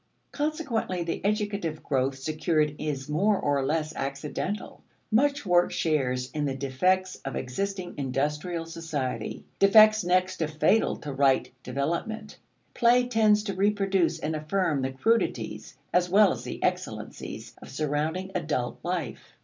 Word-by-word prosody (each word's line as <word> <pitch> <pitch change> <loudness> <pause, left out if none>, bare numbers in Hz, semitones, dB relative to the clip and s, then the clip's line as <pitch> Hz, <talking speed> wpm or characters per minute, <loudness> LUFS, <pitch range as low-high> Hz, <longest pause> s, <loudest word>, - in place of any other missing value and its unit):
Consequently 290 - -1
the 165 - -4
educative 200 -7 -1
growth 135 -1 0
secured 155 +1 0
is 140 -3 -3
more 195 +8 +2
or 140 -1 +1
less 155 +2 -1
accidental. 145 +9 -4 0.3
Much 280 +4 +2
work 175 -1 +4
shares 130 -5 0
in 150 -2 -2
the 135 -2 -1
defects 180 +8 +1
of 135 - -6
existing 185 +8 -3
industrial 150 +5 -2
society 150 -9 -4 0.2
defects 215 +1 +7
next 185 +1 +1
to 160 - 0
fatal 160 +8 +2
to 145 -2 -6
right 135 -1 +2
development. 170 - -3 0.3
Play 245 +1 +4
tends 215 -3 +3
to 200 -2 -3
reproduce 195 -3 +1
and 160 -1 -3
affirm 155 -1 0
the 130 - -1
crudities, 130 - -1 0.2
as 180 0 +3
well 200 0 +6
as - - -5
the - - -6
excellencies, - - -4
of - - -11
surrounding 155 +6 -2
adult 150 -8 -2
life. 175 -6 -4
165 Hz, 135 wpm, -27 LUFS, 140-195 Hz, 0.3 s, defects